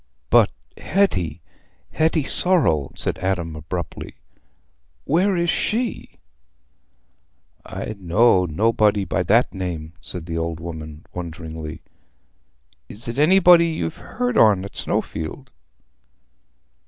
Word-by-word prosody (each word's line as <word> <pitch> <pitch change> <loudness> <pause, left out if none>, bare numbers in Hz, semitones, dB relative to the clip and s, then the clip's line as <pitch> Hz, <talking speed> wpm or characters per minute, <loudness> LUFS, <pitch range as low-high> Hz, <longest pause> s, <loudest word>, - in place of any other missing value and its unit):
"But - - +6 0.3
Hetty—Hetty 155 - -1
Sorrel," 135 - +2
said - - -3
Adam, 90 -4 -2
abruptly; 85 +3 -6 0.9
"Where 185 +5 +2
is 170 -1 +2
she?" 235 +2 -2 1.5
"I - - -6
know 95 +2 +4
nobody 105 +3 +2
by 95 - -1
that 110 +8 +3
name," 85 -4 -5
said 85 +4 -7
the 85 -1 -3
old 80 -1 -3
woman, 80 -2 -8
wonderingly. 80 -2 -7 1.1
"Is 110 +4 -9
it 115 +4 -3
anybody 175 +1 +6
ye've 120 - -3
heared 245 -2 -2
on 100 -3 +5
at 100 - -10
Snowfield?" 80 -1 -3
95 Hz, 100 wpm, -22 LUFS, -, 1.5 s, But